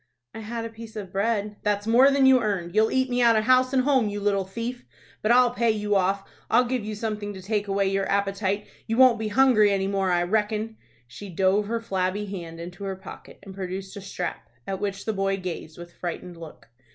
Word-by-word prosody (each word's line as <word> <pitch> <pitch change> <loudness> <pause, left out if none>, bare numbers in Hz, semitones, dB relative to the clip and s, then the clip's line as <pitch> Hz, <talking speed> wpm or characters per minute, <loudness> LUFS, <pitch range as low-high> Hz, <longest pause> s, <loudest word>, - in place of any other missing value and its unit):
"I - - -7
had 230 +1 -5
a - - -5
piece 225 0 -11
of 200 -4 -6
bread." 205 +1 -1
"That's 205 -1 0
more 245 +5 +6
than 275 -1 +3
you 260 -1 +6
earned. 190 -6 -2
You'll 220 +1 +4
eat 260 0 +1
me 250 -1 0
out 235 -1 +5
of 215 - +2
house 255 +2 +4
and 260 -2 +2
home, 260 -6 +2
you 205 0 -4
little 200 -1 0
thief! 235 +6 -5 0.4
But 215 - +2
I'll 245 0 +5
pay 235 -1 +1
you 210 -1 0
off. 195 +1 +1 0.2
I'll 245 +2 +4
give 250 -2 -2
you 215 0 -4
something 210 -1 -4
to - - -8
take 205 +1 -1
away 195 0 +1
your 195 0 -1
appetite. 200 0 0 0.2
You 225 - -1
won't 255 -3 +6
be 220 - -2
hungry 215 -2 +4
any 195 -1 0
more, 195 -1 0
I 175 -1 +2
reckon." 215 +3 -1 0.3
She 135 +12 -10
dove 190 +3 +1
her 230 +1 -1
flabby 195 -2 -2
hand 170 -4 -7
into 175 +3 -8
her 195 -1 -3
pocket, 190 - -12
and 195 -1 -10
produced 190 0 -6
a 200 - -7
strap, 185 -2 -5 0.2
at 195 -1 -4
which 200 -1 -4
the 220 - -1
boy 195 -1 0
gazed 175 -4 -6
with 175 0 -11
frightened 175 0 -6
look. 165 -7 -12
205 Hz, 225 wpm, -25 LUFS, 195-230 Hz, 0.4 s, more